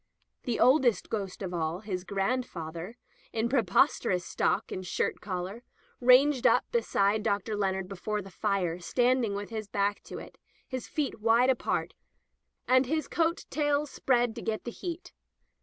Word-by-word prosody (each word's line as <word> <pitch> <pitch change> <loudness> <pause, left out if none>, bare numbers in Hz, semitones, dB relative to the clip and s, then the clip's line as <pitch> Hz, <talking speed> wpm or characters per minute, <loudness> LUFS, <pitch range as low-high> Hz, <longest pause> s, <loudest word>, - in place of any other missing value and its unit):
The 240 -3 -1
oldest 255 -3 +4
ghost 200 -3 -3
of 180 -1 -4
all, 165 +2 -2
his 190 -4 -4
grandfather, 195 -3 -3 0.3
in 225 +1 0
preposterous 195 -6 +2
stock - - 0
and 185 - -4
shirt 180 - -2
collar, 185 +3 -4 0.4
ranged 255 +2 +5
up - - +4
beside 215 - +2
Dr. 210 0 -1
Leonard 190 -2 -1
before 205 +2 -3
the 195 - -12
fire, 185 -4 -1
standing 245 +2 +1
with 205 +2 -5
his 220 -2 -4
back 200 0 0
to - - -7
it, - - -11 0.3
his 255 -3 -5
feet 290 -7 -2
wide 230 +4 +4
apart, 255 - -1 0.7
and 255 0 +4
his 310 +3 -1
coat 335 0 0
tails 290 0 +1
spread 245 -3 +1
to - - -4
get 220 -1 -2
the 240 - -5
heat. 355 +5 -7
220 Hz, 155 wpm, -29 LUFS, 195-255 Hz, 0.7 s, ranged